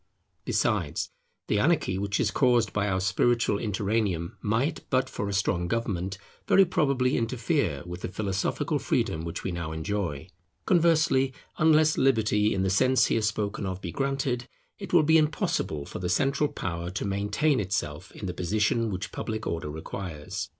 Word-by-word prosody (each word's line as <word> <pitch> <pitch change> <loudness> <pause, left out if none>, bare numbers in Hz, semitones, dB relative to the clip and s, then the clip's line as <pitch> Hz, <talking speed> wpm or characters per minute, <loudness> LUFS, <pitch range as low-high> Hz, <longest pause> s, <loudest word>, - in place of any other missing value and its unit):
Besides, - - 0 0.3
the 105 - +1
anarchy 135 - +2
which 100 +1 -1
is 110 - +1
caused 120 -5 +2
by 105 -1 0
our 95 -1 +1
spiritual 100 +3 +2
interregnum, 100 -5 -1
might, 120 +9 0
but 130 0 +2
for 100 -5 -4
a - - -2
strong 90 -3 0
government, 100 -3 -2 0.3
very 195 - +6
probably 135 -6 +1
interfere 115 - 0
with 90 0 -7
the - - -3
philosophical 95 0 -1
freedom 80 - 0
which 85 -1 -5
we 95 - -2
now 85 -2 -4
enjoy. 80 -2 -3 0.4
Conversely, 160 -7 +3 0.2
unless 155 0 +4
Liberty 110 -5 +3
in 95 - 0
the 95 - +1
sense 130 +5 +4
here 115 - +1
spoken 105 -2 -1
of 95 0 -4
be 85 -3 -5
granted, 135 -2 -1 0.3
it 195 -4 -7
will 170 -3 +6
be 160 +2 +5
impossible 150 - -1
for - - -7
the 90 -1 -2
central 140 +7 +2
power 85 -1 -4
to 95 +3 -3
maintain 105 +9 +1
itself 95 -3 -3
in - - -7
the 90 - -3
position 105 +6 +1
which 95 -2 -4
public 110 -1 -4
order 80 -2 -3
requires. 80 0 -6
105 Hz, 165 wpm, -27 LUFS, 95-130 Hz, 0.4 s, very